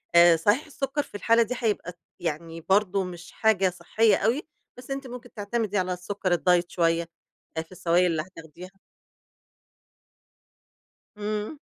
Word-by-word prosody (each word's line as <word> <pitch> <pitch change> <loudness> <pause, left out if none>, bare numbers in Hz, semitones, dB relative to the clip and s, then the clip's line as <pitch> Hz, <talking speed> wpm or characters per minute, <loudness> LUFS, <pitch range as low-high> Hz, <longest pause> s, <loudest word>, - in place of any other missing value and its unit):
آآ، 170 -1 +8
صحيح 205 - +2
السكر 285 -1 -2
في - - -16
الحالة 230 +3 +4
دي 240 +3 -4
هيبقى 205 -7 -2 0.2
يعني 165 +1 -4
برضو 195 +2 +2
مش 175 -1 -8
حاجة 195 -4 +3
صحّية 195 +5 +2
أوي، 230 +10 +1 0.3
بس 250 +2 -10
أنتِ 270 0 -4
ممكن 245 0 -10
تعتمدي 210 0 -2
على 185 -1 0
السكر 185 +1 -3
الدايت 175 0 +3
شوية، 165 -1 +1 0.5
آآ، - - +1
في 165 +2 -15
السوايل 175 0 +2
اللي 160 -1 0
هتاخديها. 180 +2 -12 2.4
إمم. 210 +6 -3
190 Hz, 140 wpm, -26 LUFS, 175-220 Hz, 2.4 s, آآ